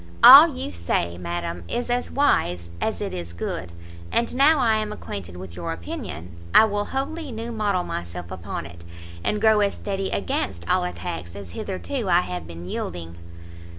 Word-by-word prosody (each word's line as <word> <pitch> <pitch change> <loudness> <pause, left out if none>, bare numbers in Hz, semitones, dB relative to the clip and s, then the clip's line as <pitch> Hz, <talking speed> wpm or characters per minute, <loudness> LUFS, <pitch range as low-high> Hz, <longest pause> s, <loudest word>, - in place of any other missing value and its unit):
"All - - +12
you 90 +3 -4
say, 85 0 -1
madam, 85 0 -4
is 240 - -2
as 245 0 0
wise 90 - +1
as - - -1
it - - -3
is 85 -2 -6
good, 85 0 -4 0.4
and 235 +1 +1
now 295 +4 +6
I 230 -5 +3
am 215 -1 -2
acquainted 90 - -7
with 90 -1 -9
your 85 -1 -4
opinion, 85 0 -6 0.2
I - - +9
will 205 -1 -1
wholly 285 +2 -3
new 230 +1 -5
model 205 -5 0
myself 85 - -6
upon 85 -2 -5
it, 85 0 -11 0.4
and 210 - 0
grow 220 0 +5
as 200 -1 +1
steady 195 -1 -3
against 95 -2 -2
all - - +2
attacks 85 -1 -5
as 100 -3 -8
hitherto 200 - -4
I 175 0 +5
have 90 - -5
been 85 0 -9
yielding." 85 -2 -5
90 Hz, 175 wpm, -24 LUFS, -, 0.4 s, All